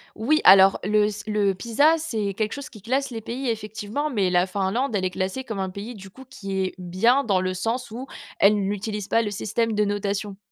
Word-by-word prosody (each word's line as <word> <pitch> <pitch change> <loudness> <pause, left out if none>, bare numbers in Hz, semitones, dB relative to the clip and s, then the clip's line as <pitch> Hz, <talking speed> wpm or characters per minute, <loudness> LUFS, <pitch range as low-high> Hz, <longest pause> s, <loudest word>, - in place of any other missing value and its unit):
Oui. 305 +8 +2
Alors 195 0 +8
le 210 +1 +3
s 210 0 -3
le 205 -2 +1
PISA, 240 - +3
c'est 220 -11 -3
quelque 215 +1 -2
chose 280 -1 -6
qui 215 -5 -14
classe 265 +4 -1
les 225 -2 -6
pays, 250 +3 -4
effectivement. 220 +6 -3
Mais, 200 -7 +1
la 180 0 +3
Finlande, 200 +7 -1
elle 190 -2 0
est 185 - 0
classée 190 +8 -3
comme 220 -5 -5
un 190 -1 -2
pays, 205 +6 -7
du 195 -2 -11
coup, 265 +6 -14
qui 205 -7 -7
est 185 - -2
bien, 210 +10 +2
dans 195 -4 +2
le 185 0 -2
sens 230 +6 -3
où 245 +5 -7 0.3
elle 205 +1 +5
n'utilise 205 +1 -3
pas 230 - +3
le 210 - -3
système 220 +3 -1
de 210 0 +2
notation. 200 0 -2
210 Hz, 225 wpm, -24 LUFS, 195-235 Hz, 0.3 s, Alors